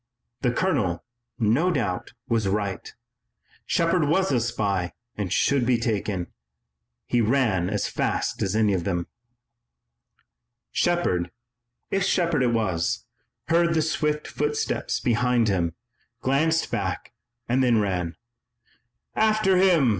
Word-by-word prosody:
The 125 Hz, -, +2 dB
colonel, 105 Hz, -, 0 dB, 0.3 s
no 120 Hz, +11 st, +2 dB
doubt, 105 Hz, -, -2 dB
was 115 Hz, -4 st, +1 dB
right. 100 Hz, -1 st, -2 dB, 0.8 s
Shepard 170 Hz, -1 st, +2 dB
was 185 Hz, +5 st, +2 dB
a 125 Hz, -, +3 dB
spy 100 Hz, -6 st, -1 dB, 0.2 s
and 100 Hz, -4 st, -3 dB
should 135 Hz, +6 st, +2 dB
be 120 Hz, 0 st, +3 dB
taken. 105 Hz, -5 st, -1 dB, 0.8 s
He 120 Hz, -, +1 dB
ran 110 Hz, -7 st, +2 dB
as 105 Hz, 0 st, -1 dB
fast -, -, -1 dB
as 95 Hz, +2 st, 0 dB
any 110 Hz, -2 st, +3 dB
of 90 Hz, -3 st, -1 dB
them. 85 Hz, -2 st, -1 dB, 1.7 s
Shepard, 130 Hz, -, +1 dB, 0.6 s
if 195 Hz, -1 st, +1 dB
Shepard 170 Hz, -6 st, +1 dB
it 125 Hz, -2 st, +3 dB
was, 95 Hz, -8 st, 0 dB, 0.4 s
heard 170 Hz, 0 st, +3 dB
the 160 Hz, -, +3 dB
swift 150 Hz, -1 st, -1 dB
footsteps 150 Hz, 0 st, -1 dB
behind 120 Hz, -1 st, +2 dB
him, 85 Hz, -4 st, 0 dB, 0.5 s
glanced 160 Hz, +5 st, +1 dB
back -, -, -3 dB, 0.3 s
and 125 Hz, +3 st, +2 dB
then 120 Hz, -3 st, +4 dB
ran. 90 Hz, -5 st, -1 dB, 1.0 s
"After 215 Hz, -3 st, +3 dB
him!" 175 Hz, -8 st, +4 dB
120 Hz, 120 wpm, -25 LUFS, 100-160 Hz, 1.7 s, then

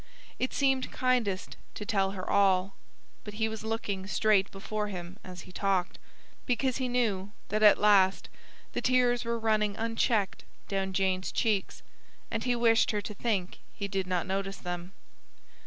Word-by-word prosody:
It 255 Hz, -, 0 dB
seemed 265 Hz, -2 st, +1 dB
kindest 240 Hz, -7 st, 0 dB, 0.2 s
to 210 Hz, -, -5 dB
tell 195 Hz, -4 st, +1 dB
her 185 Hz, -2 st, -6 dB
all; 195 Hz, -1 st, +3 dB, 0.5 s
but 210 Hz, -1 st, -8 dB
he 220 Hz, +1 st, +1 dB
was 220 Hz, -1 st, -6 dB
looking 205 Hz, -4 st, -3 dB
straight 205 Hz, -1 st, +3 dB
before 210 Hz, +2 st, -4 dB
him 180 Hz, -1 st, -7 dB
as 180 Hz, -1 st, -9 dB
he 185 Hz, -, -13 dB
talked, 190 Hz, -1 st, 0 dB, 0.5 s
because 255 Hz, 0 st, +1 dB
he 260 Hz, -2 st, -1 dB
knew 210 Hz, -6 st, 0 dB, 0.2 s
that 215 Hz, +1 st, 0 dB
at 210 Hz, -1 st, +8 dB
last 195 Hz, -2 st, +4 dB, 0.5 s
the -, -, -2 dB
tears 250 Hz, -1 st, +3 dB
were 235 Hz, 0 st, -1 dB
running 215 Hz, -2 st, +1 dB
unchecked 225 Hz, -2 st, 0 dB, 0.2 s
down 195 Hz, -1 st, -1 dB
Jane's 185 Hz, -1 st, 0 dB
cheeks, 215 Hz, -5 st, -1 dB, 0.5 s
and 225 Hz, -1 st, -2 dB
he 245 Hz, -1 st, +2 dB
wished 230 Hz, -1 st, +4 dB
her 210 Hz, -1 st, 0 dB
to 210 Hz, -, -6 dB
think 200 Hz, -4 st, -2 dB, 0.2 s
he 200 Hz, -, -3 dB
did 190 Hz, -1 st, -2 dB
not 180 Hz, -2 st, 0 dB
notice 195 Hz, 0 st, -2 dB
them. 175 Hz, +1 st, -6 dB
205 Hz, 160 wpm, -29 LUFS, 190-225 Hz, 0.5 s, at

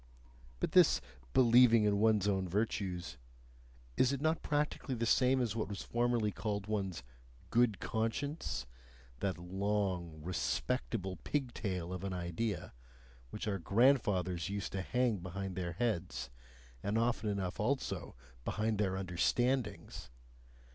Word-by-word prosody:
But -, -, -1 dB
this -, -, +6 dB, 0.3 s
"believing 120 Hz, -2 st, +6 dB
in 100 Hz, -1 st, +2 dB
one's 105 Hz, -2 st, +3 dB
own 95 Hz, -2 st, 0 dB
virtues" 95 Hz, -, -2 dB, 0.8 s
is 130 Hz, -, +4 dB
it 140 Hz, -, -1 dB
not 160 Hz, +2 st, +1 dB
practically 145 Hz, -2 st, -1 dB
the 115 Hz, 0 st, -1 dB
same 130 Hz, +2 st, +4 dB
as 115 Hz, -4 st, 0 dB
what 110 Hz, -, -1 dB
was 100 Hz, -1 st, -5 dB
formerly 120 Hz, -3 st, +1 dB
called 100 Hz, -1 st, -3 dB
one's 95 Hz, -9 st, -2 dB, 0.5 s
"good 115 Hz, -4 st, +3 dB
conscience," 110 Hz, -, -2 dB, 0.5 s
that 95 Hz, -2 st, -1 dB
long, 95 Hz, -2 st, -2 dB
respectable 90 Hz, 0 st, -2 dB
pigtail 100 Hz, -, -2 dB
of 90 Hz, 0 st, -5 dB
an 95 Hz, -1 st, -2 dB
idea, 90 Hz, +5 st, -3 dB, 0.6 s
which -, -, -5 dB
our 100 Hz, -2 st, -1 dB
grandfathers 95 Hz, -, +2 dB
used 100 Hz, -4 st, -3 dB
to 95 Hz, -, -2 dB
hang 125 Hz, +2 st, +1 dB
behind 95 Hz, +1 st, -5 dB
their 90 Hz, -1 st, -3 dB
heads, 85 Hz, -, -2 dB, 0.5 s
and 105 Hz, +2 st, 0 dB
often 115 Hz, -2 st, +1 dB
enough 95 Hz, -2 st, -2 dB
also 130 Hz, +5 st, -1 dB, 0.3 s
behind 110 Hz, -, -1 dB
their 95 Hz, -3 st, +1 dB
understandings? 115 Hz, +8 st, -1 dB
100 Hz, 125 wpm, -34 LUFS, 90-120 Hz, 0.8 s, this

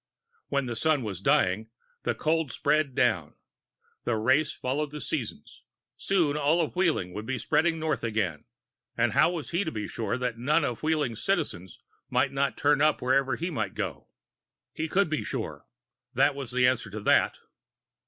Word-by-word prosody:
When 140 Hz, -1 st, 0 dB
the 120 Hz, -1 st, -4 dB
Sun 150 Hz, +2 st, +2 dB
was 100 Hz, -4 st, -5 dB
dying, 100 Hz, +4 st, +2 dB, 0.3 s
the 120 Hz, -, -1 dB
cold 155 Hz, 0 st, 0 dB
spread 145 Hz, +1 st, +1 dB
down. 85 Hz, -8 st, +1 dB, 0.7 s
The 120 Hz, -, 0 dB
race 130 Hz, +8 st, +2 dB
followed 145 Hz, +4 st, -2 dB
the 150 Hz, +1 st, -7 dB
seasons. 125 Hz, -, -5 dB, 0.3 s
Soon 170 Hz, -7 st, +1 dB
all 150 Hz, +3 st, +2 dB
of 165 Hz, 0 st, -1 dB
Wheeling 165 Hz, -, +1 dB
would 105 Hz, +3 st, -6 dB
be 130 Hz, 0 st, -1 dB
spreading 165 Hz, +8 st, +1 dB
north 155 Hz, -4 st, -1 dB
again, 105 Hz, -9 st, -1 dB, 0.5 s
and -, -, +2 dB
how 175 Hz, -, +4 dB
was 165 Hz, -4 st, -5 dB
he 170 Hz, +4 st, +1 dB
to 160 Hz, -, -3 dB
be 105 Hz, -5 st, -4 dB
sure 110 Hz, 0 st, -2 dB
that 125 Hz, -2 st, -3 dB
none 150 Hz, +7 st, +2 dB
of 120 Hz, -, -3 dB
Wheeling's 150 Hz, -7 st, 0 dB
Citizens 95 Hz, -, -1 dB, 0.3 s
might 130 Hz, +1 st, +2 dB
not 140 Hz, 0 st, 0 dB
turn 145 Hz, 0 st, +3 dB
up 155 Hz, 0 st, +3 dB
wherever 130 Hz, 0 st, +2 dB
he 170 Hz, +2 st, -3 dB
might -, -, -3 dB
go? -, -, -4 dB, 0.7 s
He 160 Hz, -, -2 dB
could 195 Hz, +4 st, +2 dB
be 155 Hz, -1 st, -2 dB
sure 80 Hz, -, -5 dB, 0.5 s
that 135 Hz, +3 st, +4 dB
was 135 Hz, -3 st, -6 dB
the 125 Hz, 0 st, +3 dB
answer 125 Hz, -4 st, +1 dB
to 105 Hz, +2 st, -6 dB
that. -, -, +3 dB
135 Hz, 175 wpm, -28 LUFS, 115-155 Hz, 0.7 s, how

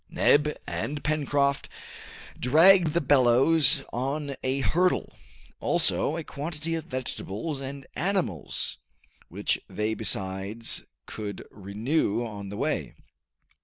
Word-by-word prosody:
Neb 150 Hz, +1 st, +3 dB
and 145 Hz, 0 st, -3 dB
Pencroft 145 Hz, -2 st, 0 dB, 0.7 s
dragged 165 Hz, +5 st, +6 dB
the 170 Hz, -, +2 dB
bellows 135 Hz, +2 st, +5 dB
on 140 Hz, +3 st, -2 dB
a 130 Hz, +1 st, -1 dB
hurdle; 180 Hz, +6 st, +1 dB, 0.5 s
also 155 Hz, -, +1 dB
a 165 Hz, -, -4 dB
quantity 155 Hz, +2 st, -4 dB
of 165 Hz, -1 st, -3 dB
vegetables 130 Hz, -, -4 dB
and 135 Hz, 0 st, -7 dB
animals, 175 Hz, -, -1 dB, 0.5 s
which -, -, 0 dB
they 105 Hz, +1 st, -1 dB
besides 100 Hz, +1 st, -3 dB, 0.2 s
could 105 Hz, -2 st, -6 dB
renew 110 Hz, +4 st, -1 dB
on 100 Hz, -3 st, -7 dB
the 100 Hz, -, -6 dB
way. -, -, -2 dB
140 Hz, 105 wpm, -27 LUFS, 110-155 Hz, 0.7 s, dragged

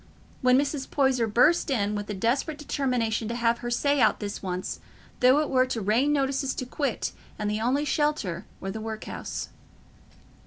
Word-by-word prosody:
when 255 Hz, 0 st, +5 dB
Mrs. 280 Hz, -1 st, -1 dB
Poyser 265 Hz, -5 st, +2 dB
burst 295 Hz, +10 st, +4 dB
in 210 Hz, -6 st, +1 dB
with 205 Hz, 0 st, -3 dB
the 210 Hz, -, -4 dB
desperate 260 Hz, -, 0 dB
determination 250 Hz, -7 st, -1 dB
to 235 Hz, -, -3 dB
have 235 Hz, 0 st, +1 dB
her 240 Hz, -, -4 dB
say 280 Hz, +3 st, +2 dB
out -, -, +4 dB
this 205 Hz, -1 st, -5 dB
once, 185 Hz, -1 st, -4 dB, 0.4 s
though 255 Hz, +3 st, +6 dB
it 305 Hz, -, -1 dB
were 255 Hz, -1 st, +4 dB
to 245 Hz, -, -2 dB
rain 225 Hz, +8 st, +2 dB
notices 270 Hz, -1 st, 0 dB
to 255 Hz, -, -3 dB
quit 270 Hz, -1 st, -2 dB, 0.3 s
and 210 Hz, -1 st, -1 dB
the 210 Hz, +1 st, -1 dB
only 265 Hz, +6 st, +1 dB
shelter 290 Hz, -, -1 dB
were 195 Hz, -, -4 dB
the 220 Hz, +2 st, -6 dB
work 220 Hz, 0 st, -5 dB
house. -, -, -5 dB
245 Hz, 185 wpm, -27 LUFS, 215-275 Hz, 0.4 s, though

